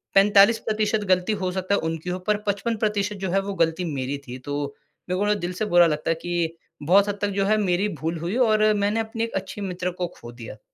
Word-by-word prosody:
45% 210 +1 +4
गलती 185 +4 +2
हो 185 -1 0
सकता 190 +2 0
है - - +1
उनकी 165 +2 -3
हो, 180 - -2
पर 210 +3 0
55% 210 0 -1
जो 190 -1 -2
है 195 - +3
वो 200 0 -4
गलती 165 +2 +1
मेरी 135 +1 -2
थी। 125 +1 -6
तो 145 +2 -4 0.5
मेरे 185 - 0
को 205 - +1
ना 210 - +4
दिल 180 -2 -4
से 215 +4 -2
बुरा 175 -3 +5
लगता 155 +1 -1
है - - +1
कि 170 -1 -2 0.3
बहुत 195 +6 +5
हद 205 - -2
तक 205 - +2
जो 195 - +2
है 215 +1 +3
मेरी 195 0 +1
भूल 165 +1 -2
हुई, 175 +7 -3
और 215 -3 +4
मैंने 205 +2 0
अपने 225 +1 -2
एक 230 - -4
अच्छी 205 - -4
मित्र 180 -1 -3
को 175 - +1
खो 120 0 -9
दिया। 115 -3 -10
195 Hz, 235 wpm, -24 LUFS, 170-210 Hz, 0.5 s, बुरा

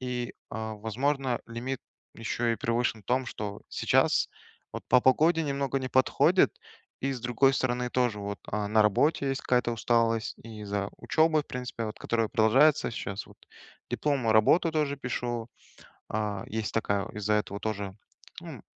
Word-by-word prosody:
И, 125 -1 -3 0.2
а, 110 0 -4
возможно, 130 +5 -1
лимит 120 +3 -4 0.3
еще 115 +1 -1
и - - -2
превышен 115 -1 -1
в - - -38
том, 130 +1 +1
что 105 -3 -6
сейчас - - +2 0.4
вот - - -6
по 125 - +6
погоде 160 +6 +4
немного 140 -1 -1
не 130 - -4
подходит. 130 0 +4 0.5
И 135 +1 0
с 125 - -6
другой 125 +3 +3
стороны 125 -2 -1
тоже 120 -5 0
вот, 100 0 -4
а, 105 -1 -1
на 110 +1 +4
работе 135 +7 +2
есть 135 - -2
какая-то 125 -1 +1
усталость, 115 0 +1
и 110 -2 -9
из-за 100 -1 -2
учебы, 155 -1 +2
в - - -33
принципе, 120 -3 -4
которая 115 -1 -1
продолжается 130 +6 +4
щас 100 -3 -5
вот. - - -17 0.5
Дипломную 135 -7 +1
работу 160 +10 +4
тоже 150 -2 0
пишу. 120 -2 -3 0.6
А, 105 -2 -2
есть 110 0 -3
такая, 100 -3 0
из-за 105 0 -1
этого 105 -1 -1
тоже, 100 -3 -4 0.5
м, - - -9
120 Hz, 155 wpm, -28 LUFS, 110-130 Hz, 0.6 s, по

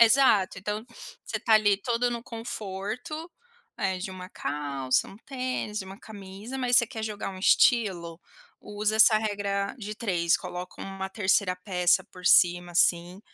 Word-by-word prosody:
Exato. 230 -5 +5
Então, 210 +3 -4 0.4
você 220 - -3
tá 220 - +3
ali 205 -2 +4
todo 240 +3 -1
no 235 -1 -4
conforto, 230 - -6 0.5
eh, 190 -2 -1
de 190 - -5
uma 185 0 -9
calça, 140 -4 -2
um 195 - -13
tênis, 255 -4 -4
de 190 - -5
uma 195 +2 -11
camisa 205 +4 -9
mas 245 -1 +3
você 235 - +5
quer 225 -4 -7
jogar 210 -2 -4
um 190 - -9
estilo, 185 -6 +2 0.4
usa 210 +1 -2
essa 220 0 +7
regra 200 -2 -2
de 210 0 -6
3, 175 -7 +1
coloca 180 +1 -8
uma 195 0 -5
3° 190 -1 +1
peça 180 -2 +2
por 180 0 -9
cima, 175 0 +5
assim, 175 +2 +2
200 Hz, 155 wpm, -27 LUFS, 185-225 Hz, 0.5 s, essa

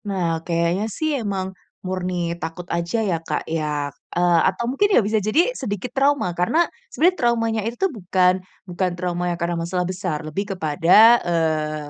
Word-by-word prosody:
Nah, 190 -3 -1 0.2
kayaknya 170 +3 0
sih 315 - 0
emang 195 -3 -2 0.4
murni 185 0 -2 0.3
takut 165 +2 -5
aja 170 +5 -1
ya 175 - +1
Kak - - -1
ya, 160 -1 -1 0.5
eee, 175 -1 +4
atau 190 +5 -4
mungkin 405 +11 +2
ya - - +6
bisa 220 +1 +1
jadi 215 +9 +1 0.2
sedikit 205 +3 -3
trauma 280 -4 +3
karena 180 - +1 0.4
sebenernya 365 0 +3
traumanya 230 -2 +1
itu 230 +1 -3
tuh 385 - +3
bukan 180 -1 +3 0.4
bukan 180 +1 -1
trauma 175 0 -2
yang 170 - -7
karena 170 0 -1
masalah 180 +1 -1
besar 180 -4 -3
lebih 195 +7 -3
kepada, 160 -2 -2 0.4
eee, 155 -3 -1
180 Hz, 165 wpm, -22 LUFS, 170-215 Hz, 0.5 s, ya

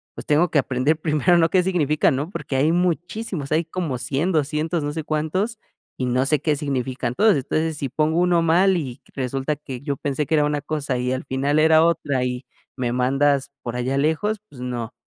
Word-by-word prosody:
pues, - - -8
tengo 155 +4 +3
que 150 - +4
aprender 130 +4 +1
primero, 155 +2 +2
¿no?, 165 -1 +3
qué 185 +1 +3
significa, 160 -5 +2
¿no?, 145 +4 -2
porque 140 - -5
hay 150 +4 +3
muchísimos, 175 -1 -2
hay 160 +2 +2
como 160 -5 -3
100, 145 +9 -1
200, 155 +1 0
no 145 - -2
sé, 160 0 -4
cuántos, 170 +9 -1 0.4
y 130 - -1
no 125 +2 +1
sé 150 +1 +2
qué 150 -1 +1
significan 130 -4 -2
todos. 215 +3 +4
Entonces, 155 +4 -1
si 140 -2 -3
pongo 155 +5 +1
uno 175 -1 +3
mal 180 +3 +4
y 135 -5 -5
resulta 135 +2 -2
que 135 -4 -8
yo 140 -1 -3
pensé 145 +2 -2
que 160 - +2
era 150 -1 +3
una 150 0 -1
cosa 145 -3 -2
y 125 +1 -1
al 130 - -4
final 140 +3 0
era 160 0 +5
otra, 145 -6 0
y 125 +1 -4 0.3
me 120 -2 -1
mandas 135 +2 +1
por 120 0 -4
allá 130 +2 -1
lejos, 160 +9 0
pues, 125 - -12
no, 120 -2 -4
150 Hz, 205 wpm, -22 LUFS, 135-165 Hz, 0.4 s, era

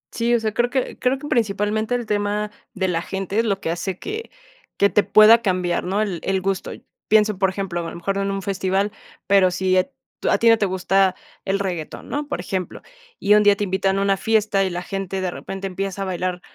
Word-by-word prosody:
Sí, 235 +1 +1
o - - +2
sea, 220 -1 -1
creo 240 +2 +1
que 260 0 -2
creo 255 +1 +1
que 295 - -7
principalmente 215 +1 0
el 240 -1 -3
tema 210 0 -1 0.2
de 190 -3 -1
la 165 -2 0
gente 195 +3 -3
es 230 - +2
lo 200 -3 -1
que - - -3
hace 175 +2 -3
que 435 - -6 0.5
que 200 - +4
te 210 - +3
pueda 220 +2 +7
cambiar, 185 -4 0
¿no? 195 +4 0
El 195 -5 -2
el 190 0 0
gusto. 195 0 -2 0.4
Pienso, 215 -1 +3
por 190 0 +2
ejemplo, 190 -2 -3
a - - -4
lo - - -9
mejor 185 +3 -2
no 200 - 0
en 195 - -1
un 195 0 -3
festival, 195 +1 -1 0.4
pero 195 -2 +5
si 185 +1 +1
e 185 - +2 0.3
tú - - -1
a - - +4
ti 230 - +4
no 225 - +6
te 205 - +2
gusta 190 0 +2 0.3
el 195 0 +1
reguetón, 180 -6 -5
¿no? 290 0 -3
Por 290 - -3
ejemplo, 185 0 -4 0.4
y 205 - +4
un 210 - +6
día 205 -1 +6
te 205 - -3
invitan 190 0 0
a - - +1
una 195 -1 +2
fiesta, 210 -2 +2
y - - -1
la 175 0 -4
gente 195 -1 -4
de 185 -1 -1
repente 195 +2 -7
empieza 195 +1 -4
a - - -3
bailar 180 -1 -3
195 Hz, 240 wpm, -22 LUFS, 185-210 Hz, 0.5 s, pueda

